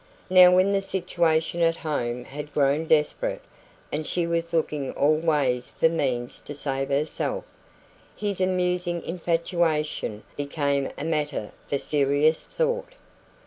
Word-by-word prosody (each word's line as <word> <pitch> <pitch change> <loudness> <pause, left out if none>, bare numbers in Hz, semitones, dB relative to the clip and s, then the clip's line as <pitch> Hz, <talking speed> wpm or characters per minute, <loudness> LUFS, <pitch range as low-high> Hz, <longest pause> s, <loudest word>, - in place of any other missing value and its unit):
Now, 180 -1 +8
when 185 +2 +4
the 195 -1 +2
situation 170 -3 0
at 165 0 +3
home 125 -7 -3
had 150 +2 -8
grown 145 +2 +2
desperate, 150 -1 +1 0.5
and 155 +1 -3
she 175 -1 0
was 170 0 -1
looking 150 -4 -1
all 150 +2 +3
ways 145 -6 0
for 165 - +5
means 130 -7 -2
to 145 - -8
save 135 -1 -1
herself, 145 +3 -1 0.7
his 200 -3 -3
amusing 180 -2 0
infatuation 165 - -1
became 140 -1 -1
a 145 - -4
matter 150 -8 -2 0.2
for 140 - 0
serious 145 +2 +2
thought. - - -2
155 Hz, 130 wpm, -25 LUFS, 145-175 Hz, 0.7 s, Now